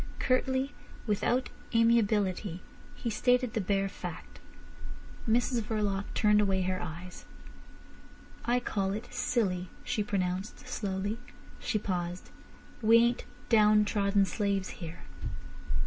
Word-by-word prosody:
Curtly, 260 +1 +1 0.3
without 240 +4 +1 0.3
amiability, 210 -5 +3 0.4
he 235 - -3
stated 250 +2 +2
the 220 - 0
bare 195 +1 +1
fact. 180 -3 -8 0.9
Mrs 240 +1 +2
Verloc 205 -2 -1
turned 210 -1 +5
away 190 -2 +2
her 185 0 -1
eyes. 175 +2 -7 1.2
"I 245 +1 +2
call 195 -5 -1
it 215 +3 -6
silly," 185 -7 0
she 215 - -1
pronounced 190 -1 -2
slowly. 200 +2 -2 0.4
She 220 - 0
paused. 180 -3 -3 0.5
"We 225 +1 +7
ain't 235 +1 +3 0.2
downtrodden 210 -2 +4
slaves 200 -1 -1
here." 165 -1 -7
205 Hz, 105 wpm, -30 LUFS, 190-230 Hz, 1.2 s, We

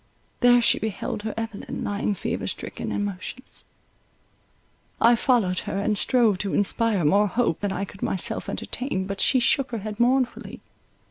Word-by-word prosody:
There 245 0 +5
she - - +3
beheld 215 0 -4
her 220 0 -4
Evelyn 225 -2 -5
lying 205 0 -1
fever - - -3
stricken - - -5
and 205 - -1
motionless. 205 +6 -7 1.3
I 235 +1 +6
followed 225 -7 +1
her, - - -2
and 210 +1 0
strove 220 -3 +3
to 200 -1 -2
inspire 205 -3 +1
more 200 +7 +4
hope 225 -5 0
than 205 -1 -2
I 195 +1 -2
could 195 - -14
myself 185 - +1
entertain; 220 -8 -3
but 195 0 -3
she 260 - +4
shook 255 +2 +1
her 235 - -3
head 210 +1 -6
mournfully. 255 +1 0
210 Hz, 160 wpm, -24 LUFS, 195-240 Hz, 1.3 s, I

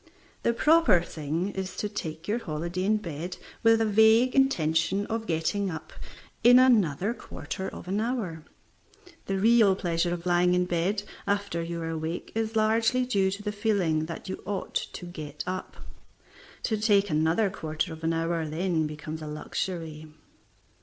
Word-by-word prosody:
The - - +2
proper 305 - +4
thing 160 +3 -3
is 190 -2 -5
to 210 - -1
take 165 -5 -6
your 220 +3 0
holiday 170 0 -3
in 215 +2 +3
bed 170 -2 -6 0.2
with 225 -1 +5
a - - +3
vague 220 +4 +5
intention 185 - +2
of 225 +1 -3
getting 180 +5 0
up 160 -2 -7 0.5
in 245 +2 +8
another 215 - +4
quarter 190 -4 -6
of - - -10
an 200 +3 0
hour. 215 -10 -3 0.8
The 195 - 0
real 215 -1 +5
pleasure 175 -2 0
of 175 0 -4
lying 180 0 +3
in 180 0 +2
bed 180 +4 0 0.2
after 200 -4 -1
you 170 0 -4
are 165 - -3
awake 160 +1 -4
is 225 0 -2
largely 225 +3 +2
due 200 -6 +2
to 200 +2 -5
the 210 - -2
feeling 195 -7 0
that 165 - -7
you 190 - -5
ought 200 -1 -4
to 180 - -3
get 155 -4 -7
up. 185 +1 -5 0.9
To 220 -3 -1
take 205 -3 +3
another 160 +7 +2
quarter 160 -2 -3
of 160 0 -11
an 165 - +1
hour 165 0 0
then 160 0 0
becomes 155 +1 -7
a 155 - -6
luxury. 155 0 -4
185 Hz, 165 wpm, -27 LUFS, 165-215 Hz, 0.9 s, in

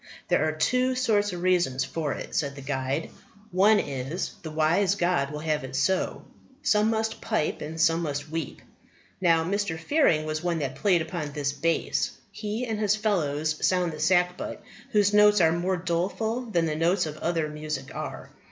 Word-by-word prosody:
"There - - +3
are - - 0
two 255 +11 +1
sorts 210 -5 +2
of 175 -1 -5
reasons 170 -8 +2
for 150 +2 -3
it," - - -7
said 140 -2 -1
the 140 - -9
guide; 135 +2 -2 0.4
"one 205 +4 +5
is, 140 +5 -3
the 160 - -6
wise 165 +5 +2
God 175 -7 +1
will 150 0 -6
have 155 -2 -1
it 130 0 -6
so: 190 +6 0 0.4
some 210 +1 +3
must 220 0 -1
pipe 220 -9 -1
and 160 +2 -6
some 165 0 +3
must 145 -2 -3
weep. 160 -4 -4 0.6
Now, 165 -3 +4
Mr. 200 -1 -1
Fearing 165 - +2
was 155 0 -2
one 175 -1 0
that 140 -4 -2
played 170 +4 +2
upon 160 -3 -5
this 145 -1 -1
base. 165 +3 0 0.2
He 215 +3 -3
and 220 -3 -3
his 210 -1 +2
fellows 155 -8 0
sound 180 -2 +2
the 155 - -8
sackbut, 180 +2 +1 0.3
whose 205 -4 +3
notes 210 0 +6
are 165 -2 +5
more 180 +3 0
doleful 195 +8 -1
than 170 -7 +1
the 155 -1 -1
notes 175 +3 +2
of 155 -1 -6
other 165 -2 0
music 150 -3 -5
are. - - -6
170 Hz, 180 wpm, -26 LUFS, 155-205 Hz, 0.6 s, notes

